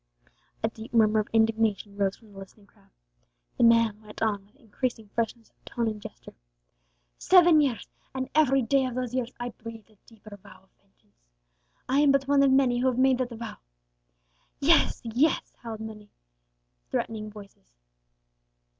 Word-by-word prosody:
A - - +3
deep 225 +2 -9
murmur 215 -1 +4
of 210 - -2
indignation 220 -2 +1
rose 200 -1 0
from 215 -3 -20
the 195 - -11
listening 195 +2 -14
crowd. - - -28 0.7
The - - +4
man 230 -2 +4
went 210 -1 -12
on 205 -3 -1
with 210 - -31
increasing 230 -3 -5
fierceness 230 +1 -4
of - - -44
tone 235 -1 -3
and 215 -1 -4
gesture. - - -11 0.9
"Seven 350 -4 +6
years! 260 -7 -1 0.3
and 260 0 -3
every 275 -4 +3
day 265 +3 +2
of 250 - -6
those 250 -1 -3
years 255 -1 -2
I 240 0 -3
breathed 225 -1 -11
a 215 - -26
deeper 215 -2 -13
vow 190 - -17
of - - -31
vengeance. - - -38 0.7
I 265 +2 +2
am 290 -1 +5
but 275 -1 +1
one 280 0 +4
of 275 - +5
many 260 -2 +3
who 255 - +1
have 255 -2 0
made 260 0 +3
that 255 -1 -1
vow 230 -1 -8 0.6
" - - -43
"Yes, - - +3
yes!" 250 +7 0
howled 225 -2 -7
forth 220 - -5
many 210 -1 -12 0.8
threatening 215 - -3
voices. 200 - -15
225 Hz, 175 wpm, -27 LUFS, 210-255 Hz, 0.9 s, Seven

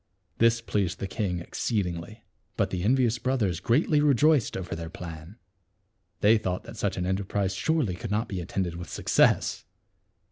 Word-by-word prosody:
This 115 0 +4
pleased 100 -4 -1
the - - -4
king 95 -2 -2
exceedingly. 100 +2 -3 0.3
But - - +1
the 90 - -2
envious 120 +2 +2
brothers 110 -10 0
greatly 145 +4 +2
rejoiced 150 -1 +3
over 95 -1 -4
their 80 0 -6
plan. 85 +3 -9 0.8
They 110 +2 +5
thought 90 -3 -3
that - - -10
such - - -2
an 90 - -1
en 95 +1 +1
terprise 100 -1 -2
surely 155 - +1
could 100 +5 -6
not 110 +3 0
be 95 -4 -4
attended 85 0 -3
with 85 -3 -7
suc - - -7
cess. - - +3
100 Hz, 170 wpm, -27 LUFS, 90-115 Hz, 0.8 s, They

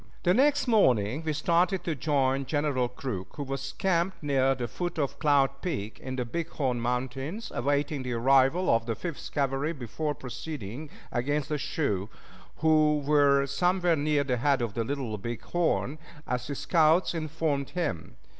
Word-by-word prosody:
The 180 - +4
next 285 +4 +3
morning 130 - +3
we 160 - -1
started 175 +4 +1
to 170 - -1
join 135 -2 0
General 145 -5 0
Crook, 125 -7 -6
who 145 - -4
was 135 0 -4
camped 175 +2 0
near 135 -2 +2
the 120 -2 -3
foot 175 +8 -4
of 140 -2 -2
Cloud 140 -3 +2
Peak 120 - -4
in 130 0 -5
the 125 -1 -2
Big 165 +8 -3
Horn 125 -5 -1
Mountains, 130 - -3
awaiting 145 +2 0
the 125 -1 -3
arrival 135 +8 +3
of 115 0 +2
the 115 - -1
Fifth 165 - -6
Cavalry 140 +2 0
before 145 +3 -3
proceeding 135 0 -7 0.2
against 145 +4 -1
the 150 -1 -1
Sioux, 105 - -1 0.5
who 155 -1 +4
were 140 -1 +4
somewhere 175 +5 +2
near 145 -1 +1
the 130 -3 0
head 135 0 +2
of 115 -4 -3
the 115 - -1
Little 120 -4 -3
Big 120 +3 -5
Horn 160 -4 0 0.3
as 125 0 -2
his 140 -1 -4
scouts 160 +4 +3
informed 155 -3 -2
him. 160 - -3
140 Hz, 165 wpm, -28 LUFS, 130-160 Hz, 0.5 s, The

